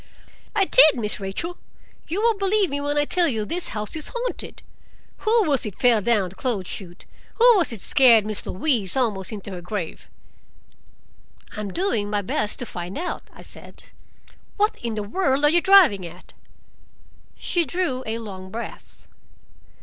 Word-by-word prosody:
"I 400 Hz, -3 st, +4 dB
did; 310 Hz, -, +7 dB
Miss 210 Hz, -2 st, -1 dB
Rachel, 205 Hz, -, -5 dB, 0.5 s
you 380 Hz, +7 st, -2 dB
won't 455 Hz, -3 st, +2 dB
believe 395 Hz, -2 st, +1 dB
me 285 Hz, 0 st, -2 dB
when 290 Hz, +1 st, -1 dB
I 295 Hz, -, +3 dB
tell 350 Hz, +2 st, +2 dB
you 220 Hz, -7 st, -1 dB
this 335 Hz, +7 st, -4 dB
house 210 Hz, +4 st, -4 dB
is 310 Hz, -, -2 dB
haunted. -, -, -5 dB, 0.5 s
Who 445 Hz, +1 st, +2 dB
was 280 Hz, -3 st, +1 dB
it 210 Hz, -5 st, -6 dB
fell 240 Hz, -4 st, +4 dB
down 205 Hz, -4 st, +1 dB
the 185 Hz, -, -14 dB
clothes 205 Hz, -6 st, -3 dB
chute? 175 Hz, -3 st, -8 dB, 0.3 s
Who 470 Hz, -, +3 dB
was 345 Hz, -7 st, +1 dB
it 225 Hz, -5 st, -7 dB
scared 235 Hz, -5 st, +5 dB
Miss 215 Hz, -1 st, -4 dB
Louise 225 Hz, -, 0 dB
almost 210 Hz, -7 st, 0 dB
into 205 Hz, -2 st, -7 dB
her 180 Hz, -2 st, -7 dB
grave?" 175 Hz, -2 st, -6 dB, 1.5 s
"I'm 210 Hz, -2 st, -4 dB
doing 230 Hz, -, 0 dB
my 205 Hz, -1 st, -1 dB
best 210 Hz, +3 st, -2 dB
to 245 Hz, -, -4 dB
find 175 Hz, -2 st, -7 dB
out," 350 Hz, +3 st, -4 dB
I -, -, -14 dB
said. -, -, -12 dB, 0.7 s
"What 420 Hz, +1 st, +2 dB
in 230 Hz, -2 st, -3 dB
the 210 Hz, -, -3 dB
world 275 Hz, -, +1 dB
are -, -, +6 dB
you 345 Hz, +1 st, +3 dB
driving 365 Hz, -, +6 dB
at?" 175 Hz, +2 st, -15 dB, 1.0 s
She 345 Hz, -, 0 dB
drew 295 Hz, -4 st, -2 dB
a 220 Hz, +1 st, -2 dB
long 190 Hz, -4 st, -8 dB
breath. 230 Hz, +4 st, -9 dB
240 Hz, 170 wpm, -23 LUFS, -, 1.5 s, did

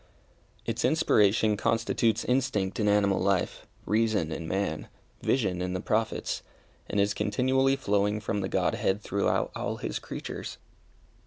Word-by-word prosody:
Its -, -, -2 dB
inspiration 105 Hz, +1 st, +3 dB
constitutes 115 Hz, +1 st, +1 dB
instinct 125 Hz, -7 st, 0 dB
in 105 Hz, -, +1 dB
animal 100 Hz, -1 st, +3 dB
life, 95 Hz, -1 st, 0 dB, 0.2 s
reason 105 Hz, -6 st, +1 dB
in 80 Hz, +1 st, -4 dB
man, 95 Hz, -5 st, -2 dB, 0.3 s
vision 95 Hz, -9 st, 0 dB
in 90 Hz, 0 st, -2 dB
the 90 Hz, -, -2 dB
Prophets, 110 Hz, +3 st, -1 dB, 0.5 s
and 105 Hz, -, 0 dB
is 100 Hz, 0 st, +2 dB
continually 130 Hz, +6 st, +2 dB
flowing 105 Hz, -4 st, +1 dB
from 105 Hz, -1 st, -2 dB
the 95 Hz, -, -2 dB
Godhead 95 Hz, +3 st, 0 dB
throughout 100 Hz, +1 st, 0 dB
all -, -, -2 dB
His -, -, -3 dB
creatures. -, -, -6 dB
105 Hz, 135 wpm, -28 LUFS, 95-110 Hz, 0.5 s, inspiration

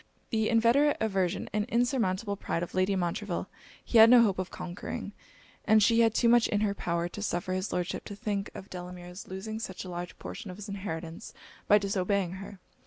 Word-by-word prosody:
The 220 Hz, -1 st, +1 dB
inveterate 235 Hz, +6 st, +4 dB
aversion 195 Hz, -5 st, 0 dB
and 210 Hz, 0 st, +1 dB
insurmountable 230 Hz, -4 st, 0 dB
pride 175 Hz, -3 st, -2 dB
of 175 Hz, -, -7 dB
Lady 185 Hz, +1 st, +2 dB
Montreville, 185 Hz, +1 st, -2 dB, 0.4 s
he 230 Hz, -, +4 dB
had 225 Hz, +1 st, +10 dB
no 245 Hz, -1 st, +8 dB
hope 195 Hz, -4 st, +1 dB
of 185 Hz, -, -3 dB
conquering; 175 Hz, 0 st, -6 dB, 0.5 s
and 215 Hz, -1 st, +5 dB
she 230 Hz, +2 st, +4 dB
had 225 Hz, -1 st, +4 dB
too 240 Hz, -, +3 dB
much 235 Hz, 0 st, +5 dB
in 205 Hz, -, 0 dB
her 205 Hz, -2 st, +1 dB
power, 170 Hz, -3 st, -1 dB
to 210 Hz, -, -7 dB
suffer 185 Hz, -2 st, -2 dB
his 185 Hz, +2 st, -2 dB
Lordship 180 Hz, +1 st, -2 dB
to 205 Hz, -, -7 dB
think 200 Hz, -1 st, -3 dB
of 190 Hz, -, -9 dB
Delamere's 180 Hz, +1 st, -8 dB
losing 215 Hz, +4 st, -5 dB
such 190 Hz, -4 st, -6 dB
a -, -, -7 dB
large 175 Hz, 0 st, -6 dB
portion 205 Hz, -, -7 dB
of 180 Hz, -, -8 dB
his 210 Hz, 0 st, -8 dB
inheritance 170 Hz, -5 st, -6 dB, 0.3 s
by 205 Hz, -, +7 dB
disobeying 195 Hz, -2 st, 0 dB
her. 195 Hz, +1 st, -9 dB
200 Hz, 195 wpm, -29 LUFS, 180-220 Hz, 0.5 s, had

